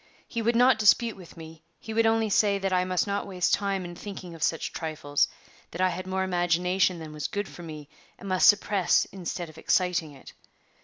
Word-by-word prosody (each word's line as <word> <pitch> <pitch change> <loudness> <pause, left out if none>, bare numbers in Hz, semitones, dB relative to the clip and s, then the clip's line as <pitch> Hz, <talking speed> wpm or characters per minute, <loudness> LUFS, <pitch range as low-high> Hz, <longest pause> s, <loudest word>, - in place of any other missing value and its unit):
He 230 - -3
would 235 +1 +1
not 250 +2 +5
dispute 225 +2 +4
with 180 -3 -14
me; 160 -1 -11 0.2
he 220 - -7
would 225 0 +3
only 225 -1 +1
say 200 0 +3
that 195 -1 -2
I 180 0 +3
must 185 -1 0
not 200 0 -2
waste 185 -2 0
time 195 -2 0
in 175 - -7
thinking 185 -1 -8
of 165 - -12
such 165 0 -1
trifles; 155 -3 -1 0.4
that 170 - -9
I 185 0 +3
had 185 +1 -5
more 190 0 -1
imagination 180 0 +1
than 160 -2 -9
was 150 -1 -3
good 205 0 -3
for - - -11
me, 155 -3 -9 0.3
and 200 - -10
must 185 -1 +4
suppress 205 -2 +3
instead 175 -2 -5
of 155 0 -13
exciting 180 -4 0
it. 135 - -14
185 Hz, 210 wpm, -27 LUFS, 170-200 Hz, 0.4 s, not